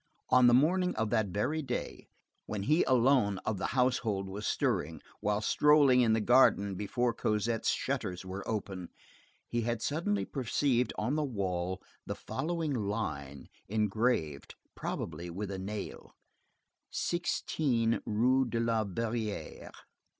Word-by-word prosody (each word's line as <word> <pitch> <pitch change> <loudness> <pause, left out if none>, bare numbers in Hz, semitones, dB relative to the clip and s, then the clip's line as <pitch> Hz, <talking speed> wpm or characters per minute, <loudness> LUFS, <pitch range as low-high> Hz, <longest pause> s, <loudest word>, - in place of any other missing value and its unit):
On 125 -1 +6
the 120 - +6
morning 180 +7 +3
of 110 -1 -1
that 110 -3 +2
very 120 - -1
day, 130 -4 -5 0.4
when 105 -2 -3
he 155 - +3
alone 125 -5 +3
of 110 -3 -1
the - - -1
household 115 -6 +1
was 100 +2 -5
stirring, 80 +1 0 0.2
while 105 0 0
strolling 145 0 +5
in 115 -2 +4
the 110 - +2
garden 105 -4 +4
before 115 +5 -1
Cosette's 110 +1 0
shutters 105 -10 -2
were 95 +2 -5
open, 95 -5 -4 0.6
he 120 - -1
had 115 0 -1
suddenly 170 - 0
perceived 125 -2 0
on 120 +6 0
the 155 0 +1
wall, 95 -7 -2 0.2
the - - -3
following 160 +1 -3
line, 100 - -3 0.2
engraved, 105 - 0 0.2
probably 85 +2 -5
with 100 +4 -5
a 95 - -4
nail:— 100 +2 -6 0.7
16 130 -8 0
Rue 125 +5 +2
de 115 -1 -2
la 115 -1 +1
Verrerie. 110 -3 -4
115 Hz, 135 wpm, -31 LUFS, 100-130 Hz, 0.7 s, On